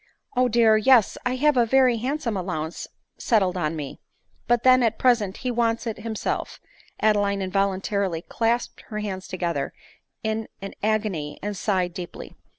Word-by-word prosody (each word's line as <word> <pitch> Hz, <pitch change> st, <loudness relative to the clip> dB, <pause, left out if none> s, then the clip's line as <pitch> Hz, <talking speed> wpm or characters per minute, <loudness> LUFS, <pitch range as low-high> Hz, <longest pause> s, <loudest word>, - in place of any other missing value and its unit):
" -, -, -32 dB
O 250 Hz, 0 st, +4 dB
dear! 225 Hz, -2 st, +5 dB
yes 230 Hz, -1 st, +5 dB
— -, -, -31 dB
I 250 Hz, -, 0 dB
have 295 Hz, +2 st, +3 dB
a 240 Hz, -, +6 dB
very 255 Hz, -1 st, +4 dB
handsome 250 Hz, -1 st, -2 dB
allowance 170 Hz, -4 st, -4 dB, 0.3 s
settled 195 Hz, -7 st, +2 dB
on 165 Hz, -3 st, -1 dB
me; 145 Hz, -3 st, -6 dB, 0.5 s
but 240 Hz, -1 st, +2 dB
then 255 Hz, 0 st, +6 dB
at 230 Hz, -2 st, +1 dB
present 220 Hz, -6 st, +2 dB
he 255 Hz, -, -2 dB
wants 230 Hz, -1 st, 0 dB
it 225 Hz, -2 st, -4 dB
himself, 225 Hz, -2 st, -3 dB, 0.4 s
(Adeline 205 Hz, -2 st, +2 dB
involuntarily 195 Hz, -2 st, -1 dB
clasped 235 Hz, +1 st, -1 dB
her 215 Hz, -, -6 dB
hands 195 Hz, -3 st, -4 dB
together 170 Hz, -6 st, -2 dB, 0.5 s
in 220 Hz, 0 st, -2 dB
an 195 Hz, 0 st, -7 dB
agony, 205 Hz, -9 st, -1 dB
and 205 Hz, 0 st, -3 dB
sighed 185 Hz, -3 st, 0 dB
deeply.) 175 Hz, -1 st, -8 dB
215 Hz, 160 wpm, -24 LUFS, 185-235 Hz, 0.5 s, a